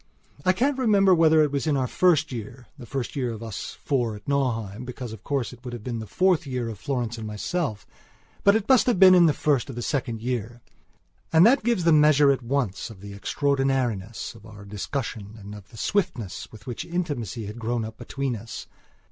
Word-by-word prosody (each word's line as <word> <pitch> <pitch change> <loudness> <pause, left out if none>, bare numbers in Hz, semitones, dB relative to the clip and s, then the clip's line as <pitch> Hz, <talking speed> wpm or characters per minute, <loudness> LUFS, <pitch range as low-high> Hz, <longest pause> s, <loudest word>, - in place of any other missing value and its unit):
I 185 - +4
can't 265 +8 +1
remember 200 -6 +5
whether 160 -2 +5
it 150 - 0
was 140 +2 -1
in 145 -2 +2
our 130 - +1
first 160 +2 +2
yearthe 120 +2 -7 0.2
first 135 -3 -4
year 125 -4 -1
of 110 0 -8
us 110 -4 -6
four 120 -6 0
at 105 - -13
Nauheim, 120 -6 -1
because, 125 -2 -7
of 110 - -11
course, 135 -4 -2
it 120 - -15
would 125 -1 -6
have 120 -3 -7
been 120 -2 -3
the 110 - -7
fourth 180 - +2
year 125 -3 -2
of 110 -4 -7
Florence 120 -4 -2
and 110 -1 -5
myselfbut 110 - -3 0.7
it 220 -2 0
must 260 -2 +5
have 245 - +3
been 185 -1 +9
in 175 -2 +7
the - - +5
first 145 -2 0
or 120 -3 -6
second 125 -5 -2
year. 120 0 -3 0.7
And 165 +3 +7
that 260 +5 +5
gives 235 -6 +1
the 165 -1 +5
measure 150 -2 +6
at 135 - 0
once 120 -6 -2
of 105 -4 -12
the 100 0 -8
extraordinariness 130 -3 -1
of 115 - -16
our 105 -2 -12
discussion 105 0 -5
and 100 -1 -10
of 105 -1 -11
the 115 - -14
swiftness 130 - -2
with 105 -2 -14
which 120 - -5
intimacy 145 - -3
had 105 +3 -7
grown 115 0 -1
up 110 0 -9
between 135 -3 -3
us. 115 +2 -8
125 Hz, 205 wpm, -25 LUFS, 110-155 Hz, 0.7 s, been